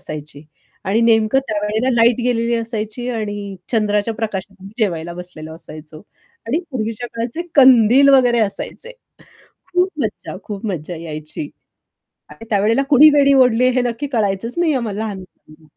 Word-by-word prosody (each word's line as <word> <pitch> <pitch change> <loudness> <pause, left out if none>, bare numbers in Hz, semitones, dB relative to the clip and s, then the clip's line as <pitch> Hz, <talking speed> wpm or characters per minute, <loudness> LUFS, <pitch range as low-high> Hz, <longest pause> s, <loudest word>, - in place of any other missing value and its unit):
असायची 150 -1 -6 0.4
आणि 205 +4 +1
नेमकं 220 +2 +3
त्यावेळेला 215 +3 -1
लाईट 235 +1 +3
गेलेली 235 -1 0
असायची 230 +1 -3
आणि 205 -3 -5
चंद्राच्या 210 -1 0
प्रकाशात 200 -3 -5
आम्ही 195 +1 -12
जेवायला 170 -4 -2
बसलेलो 165 -3 -6
असायचो 155 -1 -10 0.5
आणि 270 +8 0
पूर्वीच्या 230 -1 -4
काळाचे 235 +8 -3
कंदील 255 0 +6
वगैरे 245 -3 +4
असायचे 225 - -3 0.8
खूप 360 +1 +2
मज्जा, - - -5
खूप 205 -1 -7
मज्जा 175 -2 -4
यायची. 160 - -6 0.8
आणि 225 - -12
त्यावेळेला 220 +6 +2
कुणी 295 +2 +8
वेणी 280 -1 +4
ओढली 250 -2 +4
हे 255 - +3
नक्की 245 +4 -3
कळायचंच 205 +2 -1
नाही 340 -3 +2
आम्हाला 225 -6 -3
लहानपणी 185 -7 -9
220 Hz, 135 wpm, -18 LUFS, 195-245 Hz, 0.8 s, कुणी